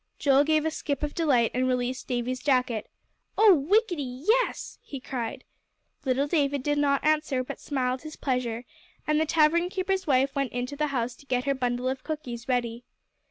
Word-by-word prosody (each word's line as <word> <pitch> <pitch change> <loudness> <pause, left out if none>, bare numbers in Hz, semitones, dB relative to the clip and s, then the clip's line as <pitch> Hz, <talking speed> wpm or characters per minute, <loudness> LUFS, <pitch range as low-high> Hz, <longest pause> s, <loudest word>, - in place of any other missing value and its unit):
Joel 280 -1 +4
gave 310 0 +2
a 320 - +1
skip 290 -2 -3
of 295 - -2
delight 265 -9 +2
and 255 +1 +1
released 250 0 -1
Davie's 250 +1 -2
jacket. 250 -5 +1 0.5
"Oh, 430 -2 +8
whickety 380 -1 +2 0.3
yes!" - - +1
he 275 - -8
cried. 245 -3 -5 0.6
Little 265 +2 +2
David 285 -3 0
did 290 0 +1
not 280 -1 +2
answer, 305 -4 +2
but - - -7
smiled 255 -2 -2
his 310 0 -8
pleasure, 250 -3 -2 0.4
and 305 0 +2
the 315 - 0
tavern 330 +3 +3
keeper's 380 -1 -1
wife 270 0 +3
went 275 -2 -2
into 245 +3 -3
the 300 +1 0
house 250 -3 -2
to 280 - -19
get 250 -1 0
her 280 0 +1
bundle 250 -1 -1
of 260 0 -2
cookies 260 -6 -5
ready. 240 -1 -1
275 Hz, 180 wpm, -27 LUFS, 250-305 Hz, 0.6 s, Oh